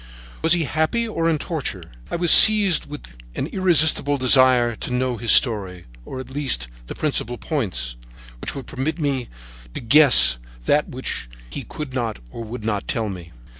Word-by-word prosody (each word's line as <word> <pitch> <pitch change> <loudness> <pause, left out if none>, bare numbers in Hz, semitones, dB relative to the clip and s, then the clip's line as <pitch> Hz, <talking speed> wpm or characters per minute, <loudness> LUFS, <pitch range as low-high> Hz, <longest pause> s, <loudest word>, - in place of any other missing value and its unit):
Was 160 0 +3
he 175 -2 +1
happy 160 +11 -1
or 165 -6 -2
in 160 - 0
torture? 140 - -5 0.3
I - - -4
was 170 -1 +3
seized 210 -5 +6
with - - -12 0.2
an - - -3
irresistible 160 -5 +1
desire 130 -2 +4
to - - -6
know 125 -1 -2
his 115 0 +1
story, 95 -7 +2 0.2
or, 130 - -8
at 130 0 -10
least, 130 - -1 0.2
the - - -8
principal 135 -5 -2
points, 90 - -4 0.4
which - - -5
would 135 - -8
permit 145 +5 -4
me 140 -6 -3 0.5
to - - -4
guess 120 - +5 0.3
that 150 +1 +1
which 125 - -5 0.2
he - - -6
could 150 -4 -8
not 120 -4 -3
or 115 - -8
would 115 0 -8
not 105 -2 -3
tell 115 -4 -2
me. 90 -4 -10
130 Hz, 170 wpm, -20 LUFS, 115-155 Hz, 0.5 s, seized